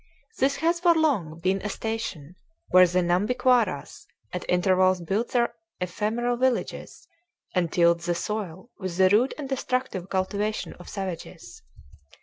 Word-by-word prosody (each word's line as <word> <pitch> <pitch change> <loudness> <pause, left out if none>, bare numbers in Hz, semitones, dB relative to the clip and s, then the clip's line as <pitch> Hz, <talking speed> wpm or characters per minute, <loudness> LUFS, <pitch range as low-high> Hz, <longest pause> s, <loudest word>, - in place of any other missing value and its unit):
This 275 +1 +3
has 335 +3 +1
for 345 -1 +4
long 205 - +1
been 190 +1 +1
a 210 - -3
station 195 -8 -4 0.3
where 185 0 +7
the 180 +1 +1
Nhambiquaras 210 - +1 0.3
at 180 - -3
intervals 185 0 +3
built 195 +7 -1
their 235 -1 +1 0.3
ephemeral 220 +7 -1
villages 255 -1 -2 0.5
and 175 -4 0
tilled 170 -1 +4
the 175 +1 -1
soil 200 +2 -5
with 185 -3 -4
the 190 0 +5
rude 225 +7 +3
and 290 -3 -5
destructive 255 -8 -2
cultivation 205 +3 -2
of 175 - -11
savages. 170 - -7
195 Hz, 135 wpm, -26 LUFS, 180-240 Hz, 0.5 s, where